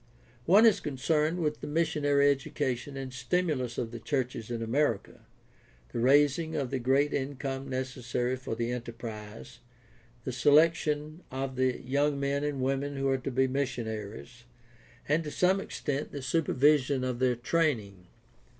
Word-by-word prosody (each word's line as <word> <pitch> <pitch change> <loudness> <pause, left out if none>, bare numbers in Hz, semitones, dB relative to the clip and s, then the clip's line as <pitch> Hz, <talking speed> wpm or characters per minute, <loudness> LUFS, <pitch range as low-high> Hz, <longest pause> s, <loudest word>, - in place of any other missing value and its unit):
One 200 +7 +7
is 220 -4 +5
concerned 150 +4 0
with 150 -1 -1
the - - -5
missionary 145 -3 +2
education 135 -1 -3
and 130 -1 -6
stimulus 130 -2 -1
of 115 - -2
the 120 - -7
churches 125 -3 -2
in 115 -1 -3
America, 115 -2 -1 0.7
the - - -2
raising 145 +5 +3
of 140 -5 -2
the 135 - -1
great 135 +4 +2
income 135 0 -3
necessary 130 -1 -2
for 130 -3 -5
the 120 +1 -2
enterprise, 115 -3 -7 0.6
the 130 - -3
selection 150 +3 +3
of 130 0 -4
the 130 -1 +1
young 140 +2 +1
men 140 +1 0
and 145 -2 -2
women 135 +2 -1
who 135 0 0
are 135 0 +1
to 130 - -4
be 130 +1 +2
missionaries, 120 -3 -4 0.6
and 155 +3 +2
to 150 - -5
some 185 +5 +2
extent 145 -5 -3
the 140 - -6
supervision 140 -1 +2
of 125 -2 -2
their 130 -1 +2
training. 115 - -1
135 Hz, 150 wpm, -29 LUFS, 125-145 Hz, 0.7 s, One